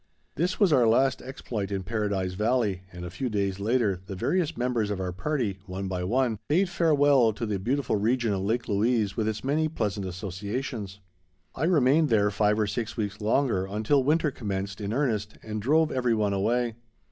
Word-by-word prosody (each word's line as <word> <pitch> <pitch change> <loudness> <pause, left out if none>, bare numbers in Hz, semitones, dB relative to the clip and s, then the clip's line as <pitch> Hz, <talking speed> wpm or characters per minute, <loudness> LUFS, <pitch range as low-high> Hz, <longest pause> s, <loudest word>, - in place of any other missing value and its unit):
This 180 +4 -1
was 195 -7 +4
our 125 -4 +5
last 130 +4 +3
exploit 120 -6 -5
in 95 -1 -2
Paradise 100 -2 -1
Valley, 105 -2 0
and 90 0 -8
a 85 - -7
few 125 +7 -3
days 100 -2 -1
later 105 -3 +1
the 95 - -5
various 165 - 0
members 120 -4 0
of 100 -2 -2
our 90 -1 -2
party, 105 -1 -2
one 95 +1 -4
by 90 -1 -3
one, 115 +2 +1
bade 175 +5 +2
farewell 145 -9 +4
to 115 +3 -4
the 105 -3 -2
beautiful 125 +3 0
region 115 +1 +1
of 95 - -1
Lake 115 +5 -1
Louise 110 0 +1
with 110 -2 -1
its 110 -1 -3
many 150 +4 +1
pleasant 105 -10 -2
associations. 100 +3 -5 0.5
I 145 - -1
remained 155 -2 +4
there 105 -3 +3
five 105 +1 +2
or 110 - +2
six 110 +2 -4
weeks 105 -1 -3
longer 110 -3 +1
until 110 +7 +1
winter 155 +2 +2
commenced 100 -4 -4
in 100 0 -3
earnest 110 -5 -1
and 110 -1 -4
drove 155 +7 +3
every 125 -3 +1
one 105 -2 +1
away. 115 +3 0
110 Hz, 190 wpm, -27 LUFS, 100-130 Hz, 0.5 s, our